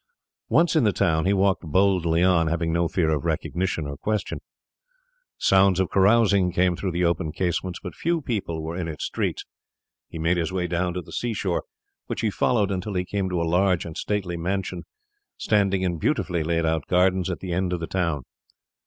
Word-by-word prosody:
Once 170 0 +3
in 155 - +4
the 105 - +4
town, 80 -4 +1
he - - +3
walked 95 -1 +2
boldly 85 0 +2
on, 90 -3 +3
having 80 0 -1
no 85 0 +2
fear 80 -2 +1
of 75 -3 -1
recognition 90 -3 -1
or 70 0 -5
question. 105 +8 -2 1.0
Sounds 95 -1 +4
of 95 - 0
carousing 100 -2 +4
came 90 0 +2
through 95 +2 -3
the 90 +1 0
open 85 -2 0
casements, 90 +1 -2
but - - -6
few 170 +1 0
people 100 - -3
were 80 +2 -4
in 90 -2 -3
its 75 -2 -4
streets. - - -2 0.6
He - - -8
made 85 +2 +1
his 85 +1 -1
way 90 -1 -1
down 90 +1 -1
to 90 - -3
the - - -14
sea 120 -2 -2
shore, 95 -3 -1 0.4
which - - -3
he 110 - +1
followed 105 -1 +1
until 95 +2 -3
he 90 0 0
came 95 0 -2
to 90 -1 -1
a - - 0
large 90 +2 +2
and 80 -2 -7
stately 95 -4 -2
mansion 90 0 -3 0.5
standing 100 -3 +1
in 85 -3 -1
beautifully 85 +2 0
laid 85 +1 0
out 80 -2 -1
gardens 95 +1 +2
at 90 - -3
the 90 -2 -4
end 90 +1 0
of 90 - -1
the 85 - -3
town. 85 -6 -1
90 Hz, 200 wpm, -24 LUFS, 85-95 Hz, 1.0 s, in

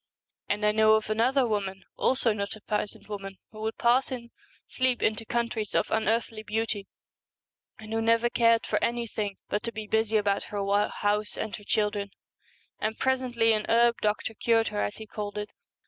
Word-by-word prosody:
And 210 +1 0
I 210 - +5
know 220 0 +5
of 220 0 -1
another 250 +5 +3
woman, 195 -4 -2
also 255 -4 +3
not 200 0 -3
a 215 - -14
peasant 210 0 -3
woman, 195 -2 -6
who 215 0 -10
would 220 +1 -3
pass 250 +3 +3
in 235 -2 -6 0.3
sleep 255 -1 0
into 215 +1 +1
countries 235 -3 -1
of - - +1
an 220 - +2
unearthly 225 0 0
beauty, 215 -1 -2 0.9
and 220 0 -8
who 225 - +1
never 230 +1 +3
cared 230 -1 +3
for - - 0
anything 225 -4 -2
but 205 - -1
to 230 - -3
be 220 -1 -6
busy 220 +1 +2
about 200 -1 +1
her 205 0 +1
house 210 0 -1
and 220 0 -3
her 210 - -14
children; 210 -1 0 0.7
and 220 +1 -2
presently 250 -4 +2
an 215 -1 -1
herb 235 +1 +4
doctor 215 +1 0
cured 225 +1 +2
her, 105 - -2
as 100 0 -2
he 220 - -9
called 210 -1 -5
it. 210 0 -4
220 Hz, 185 wpm, -28 LUFS, 210-230 Hz, 0.9 s, I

